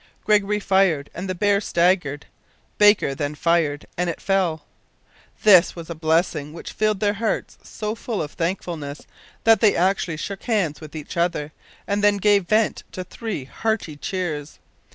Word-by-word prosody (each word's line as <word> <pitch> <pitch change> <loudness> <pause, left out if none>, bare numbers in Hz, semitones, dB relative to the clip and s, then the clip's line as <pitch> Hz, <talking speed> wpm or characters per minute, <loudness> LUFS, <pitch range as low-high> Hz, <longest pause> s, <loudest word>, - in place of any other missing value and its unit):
Gregory 210 -1 +2
fired 190 -8 +2
and 185 +2 -5
the 185 - -2
bear 200 +2 +2
staggered. 170 -6 +1 0.5
Baker 205 -9 +5
then 145 +1 -3
fired 160 -2 +1
and 180 0 -1
it 170 - -4
fell! 180 -6 0 0.8
This 185 -4 +6
was 170 -1 -8
a - - -2
blessing 160 -2 0
which 165 - -8
filled 215 -2 0
their 205 -1 +2
hearts 220 +1 -3
so 215 0 -5
full 230 -1 -4
of 150 -1 -3
thankfulness 165 -4 -4 0.4
that 225 0 +5
they 215 -3 +5
actually 180 -2 +1
shook 195 +5 -5
hands 195 - 0
with 155 0 -10
each 155 +2 -7
other, 170 -3 0 0.3
and 200 0 -1
then 205 0 +4
gave 200 -2 +3
vent 215 +2 +2
to 185 - -4
three 205 - -5
hearty 220 0 -2
cheers. 155 -3 -4
180 Hz, 160 wpm, -23 LUFS, 155-205 Hz, 0.8 s, This